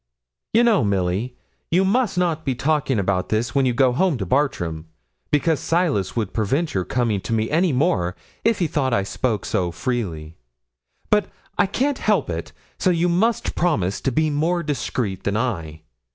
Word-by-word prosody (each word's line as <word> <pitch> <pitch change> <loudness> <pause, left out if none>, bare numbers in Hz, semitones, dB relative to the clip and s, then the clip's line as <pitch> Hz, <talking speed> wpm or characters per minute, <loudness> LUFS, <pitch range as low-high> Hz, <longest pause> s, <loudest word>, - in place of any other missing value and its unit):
'You 230 +2 +5
know, 230 - +4
Milly, 100 +4 -1 0.3
you 185 +3 +3
must 220 0 +1
not 170 -3 0
be 135 -4 -1
talking 140 0 +1
about 95 -2 0
this 115 +3 0
when 135 -1 +3
you 125 - +1
go 130 0 +4
home 170 +1 +2
to 100 - -3
Bartram, 85 - -1 0.4
because 150 +1 +2
Silas 165 - 0
would 110 -5 -2
prevent 135 +10 0
your 95 - 0
coming 115 -6 0
to 105 - -6
me 110 0 0
any 170 +2 +3
more 125 - +1 0.3
if 230 -1 +3
he 175 - +1
thought 135 -5 0
I 100 - +1
spoke 110 +1 -2
so 90 -2 0
freely; 85 -6 -3 0.7
but 210 -1 +3 0.3
I - - +3
can't 265 +7 0
help - - +1
it: - - -5 0.3
so 185 - +2
you 175 0 +2
must 215 +6 +1
promise 105 - 0
to 135 - 0
be 155 +4 +1
more 170 +4 0
discreet 125 - -2
than 100 +1 0
I. 80 -10 -3
130 Hz, 180 wpm, -22 LUFS, -, 0.7 s, You